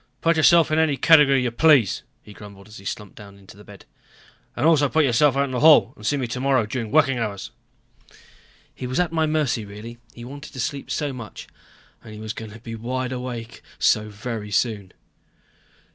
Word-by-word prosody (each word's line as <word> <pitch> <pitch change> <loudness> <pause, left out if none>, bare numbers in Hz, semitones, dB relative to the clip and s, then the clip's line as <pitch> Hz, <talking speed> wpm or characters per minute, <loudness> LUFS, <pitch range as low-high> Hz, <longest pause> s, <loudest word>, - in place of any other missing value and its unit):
"Put 165 0 +2
yourself 165 +1 +4
in 155 - +2
any 155 -3 +1
category 145 -5 +5
you 120 - -1
please," 130 - +3 0.2
he 105 - -14
grumbled 100 -1 -13
as 110 - -13
he 100 - -16
slumped 105 0 -6
down 100 -1 -13
in 100 - -19
the 100 +2 -15
bed. 100 -1 -15 0.7
"And - - -1
also 150 -4 +4
put 160 +1 +2
yourself 135 +2 +3
out 140 - +3
into 130 -2 -3
the - - -1
hall 155 +1 +6
and 105 - -16
see 145 +7 0
me 130 - -2
tomorrow 130 0 0
during 115 0 -4
working 135 -3 +2
hours." 100 -4 -5 1.2
He 125 - -7
was 130 +5 -2
at 180 -2 0
my 160 -1 0
mercy, 150 -7 0
really. 105 +4 -10 0.2
He 120 - -10
wanted 140 +1 -10
sleep 140 +2 -4
so 145 -3 -2
much. 120 -4 -9 0.6
And 110 - -11
he - - -10
was 110 0 -5
going 110 -1 -8
to 110 +2 -12
be 115 0 -9
wide 125 +3 -4
awake 125 -3 -6 0.2
so 105 0 +1
very 105 0 -6
soon. 105 -3 -1
125 Hz, 200 wpm, -22 LUFS, 110-145 Hz, 1.2 s, hall